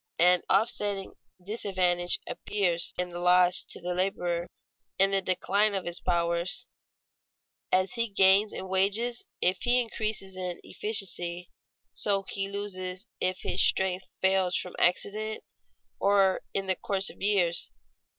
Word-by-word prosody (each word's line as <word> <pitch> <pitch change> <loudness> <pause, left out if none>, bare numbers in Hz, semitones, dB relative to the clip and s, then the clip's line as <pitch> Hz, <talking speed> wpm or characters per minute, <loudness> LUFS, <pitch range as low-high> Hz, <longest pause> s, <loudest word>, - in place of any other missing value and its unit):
An 180 0 +5
offsetting 205 -1 +1 0.3
disadvantage 185 -4 +1
appears 180 -5 -2
in 180 0 -2
the 175 - -6
loss 180 +1 +4
to - - -6
the 180 0 -3
laborer 175 -2 -1 0.5
in 195 +1 +4
the 195 0 +2
decline 200 +3 +1
of 190 - -3
his 175 +1 -4
powers. 170 +5 -1 1.1
As 185 0 +2
he 230 -1 0
gains 195 +1 +5
in 190 - -6
wages 205 +6 +1 0.2
if 180 0 +2
he 245 0 +4
increases 215 -4 -3
in 180 -2 -5
efficiency, 180 -4 0 0.4
so 200 -1 -1
he 195 0 -3
loses 190 -1 -5
if 185 0 -1
his - - 0
strength 190 0 +2
fails 190 -1 +2
from 180 - -5
accident 215 +5 0 0.6
or 195 -1 +3
in 195 - -2
the 190 -1 +1
course 195 0 -1
of - - -20
years. 190 -4 +1
190 Hz, 135 wpm, -28 LUFS, 180-200 Hz, 1.1 s, An